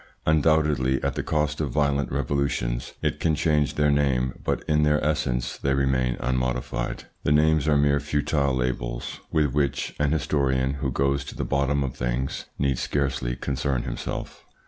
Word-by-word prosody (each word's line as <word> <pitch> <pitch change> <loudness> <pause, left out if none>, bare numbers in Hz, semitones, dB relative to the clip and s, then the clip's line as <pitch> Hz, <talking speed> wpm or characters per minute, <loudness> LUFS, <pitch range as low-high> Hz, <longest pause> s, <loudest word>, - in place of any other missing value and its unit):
Undoubtedly, 75 -4 +3
at - - 0
the - - -2
cost 75 0 -1
of 75 - -1
violent 70 +1 +1
revolutions, 65 -3 -1
it - - 0
can 80 -2 +2
change 75 -2 +1
their 75 0 +3
name, 65 -3 +1
but - - -1
in 75 0 +3
their 75 0 +3
essence 70 -6 -1
they 70 0 +1
remain 65 -2 +1
unmodified. 65 -1 -2 0.2
The - - 0
names 75 0 +3
are 75 -1 +4
mere 70 0 +3
futile 75 -1 0
labels - - -3
with 75 -5 +2
which 70 -2 0
an 75 -1 +2
historian 65 -3 +1
who 70 - 0
goes 70 +2 +1
to - - -8
the - - -3
bottom 70 +1 +1
of 65 -2 -4
things 60 +2 -2
need 70 -2 0
scarcely 70 -4 -1
concern 65 0 -1
himself. - - -5
70 Hz, 165 wpm, -25 LUFS, 65-75 Hz, 0.2 s, are